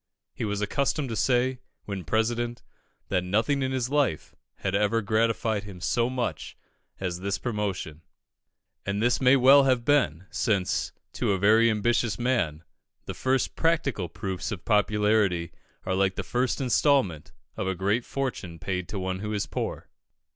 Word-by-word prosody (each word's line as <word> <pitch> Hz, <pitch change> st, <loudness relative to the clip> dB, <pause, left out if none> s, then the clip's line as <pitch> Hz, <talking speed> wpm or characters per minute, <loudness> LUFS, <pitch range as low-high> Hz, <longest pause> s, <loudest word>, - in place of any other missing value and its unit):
He -, -, -3 dB
was 105 Hz, -1 st, -2 dB
accustomed 140 Hz, +6 st, 0 dB
to 115 Hz, -, -3 dB
say, 125 Hz, +2 st, +1 dB, 0.3 s
when 95 Hz, -4 st, -5 dB
President, 120 Hz, +5 st, -1 dB, 0.5 s
that 90 Hz, -2 st, +1 dB
nothing 110 Hz, +10 st, +1 dB
in 130 Hz, 0 st, 0 dB
his 130 Hz, -2 st, -1 dB
life 145 Hz, -, 0 dB, 0.2 s
had 95 Hz, -, -3 dB
ever 105 Hz, +3 st, +2 dB
gratified 110 Hz, 0 st, +1 dB
him 100 Hz, -3 st, -10 dB
so 120 Hz, +6 st, +1 dB
much 125 Hz, -2 st, -3 dB, 0.4 s
as 90 Hz, -2 st, -3 dB
this 100 Hz, +1 st, -2 dB
promotion; 100 Hz, -9 st, -3 dB, 0.8 s
and 100 Hz, +1 st, -2 dB
this 120 Hz, +4 st, +2 dB
may 130 Hz, +1 st, +6 dB
well 135 Hz, +2 st, +7 dB
have 125 Hz, -3 st, +2 dB
been, 95 Hz, -, +2 dB
since, 100 Hz, -6 st, 0 dB, 0.2 s
to 100 Hz, -, 0 dB
a -, -, +1 dB
very 110 Hz, +4 st, +5 dB
ambitious 110 Hz, -1 st, +1 dB
man, 105 Hz, -11 st, 0 dB, 0.4 s
the -, -, -5 dB
first 130 Hz, 0 st, 0 dB
practical 145 Hz, -, 0 dB
proofs 95 Hz, +4 st, -4 dB
of 100 Hz, -5 st, -6 dB
popularity 105 Hz, -5 st, +2 dB, 0.3 s
are 95 Hz, -, -1 dB
like 95 Hz, 0 st, +1 dB
the -, -, -3 dB
first 125 Hz, 0 st, -1 dB
instalment 130 Hz, -, +2 dB, 0.2 s
of -, -, -3 dB
a 95 Hz, -, -1 dB
great 100 Hz, +6 st, 0 dB
fortune 120 Hz, -12 st, -4 dB
paid 90 Hz, 0 st, -3 dB
to 105 Hz, -, -5 dB
one 95 Hz, 0 st, -3 dB
who 105 Hz, +2 st, -4 dB
is 105 Hz, -, -1 dB
poor. -, -, -4 dB
105 Hz, 160 wpm, -27 LUFS, 95-125 Hz, 0.8 s, well